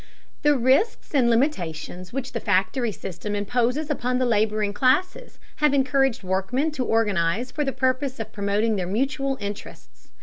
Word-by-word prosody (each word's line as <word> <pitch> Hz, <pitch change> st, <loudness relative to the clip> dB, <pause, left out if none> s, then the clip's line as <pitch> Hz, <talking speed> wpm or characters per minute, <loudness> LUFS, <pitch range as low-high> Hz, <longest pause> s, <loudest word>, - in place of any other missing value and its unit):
The 295 Hz, -2 st, +4 dB
risks 265 Hz, -, +1 dB
and 255 Hz, -4 st, +4 dB
limitations 185 Hz, -, -1 dB
which 265 Hz, 0 st, -4 dB
the 230 Hz, -, -3 dB
factory 205 Hz, +5 st, +1 dB
system 195 Hz, +2 st, -5 dB
imposes 245 Hz, +8 st, 0 dB
upon 250 Hz, +1 st, -1 dB
the 255 Hz, -, +1 dB
laboring 215 Hz, -2 st, +1 dB
classes 365 Hz, -, +1 dB, 0.2 s
have 300 Hz, -2 st, +3 dB
encouraged 270 Hz, -4 st, +2 dB
workmen 195 Hz, +11 st, 0 dB
to 270 Hz, -4 st, -2 dB
organize 220 Hz, 0 st, +1 dB
for 295 Hz, +2 st, -1 dB
the 270 Hz, -, -1 dB
purpose 260 Hz, 0 st, -1 dB
of 220 Hz, -1 st, -6 dB
promoting 205 Hz, +2 st, 0 dB
their 180 Hz, -2 st, -2 dB
mutual 270 Hz, +6 st, -1 dB
interests. 205 Hz, +1 st, -8 dB
240 Hz, 155 wpm, -24 LUFS, 205-270 Hz, 0.2 s, The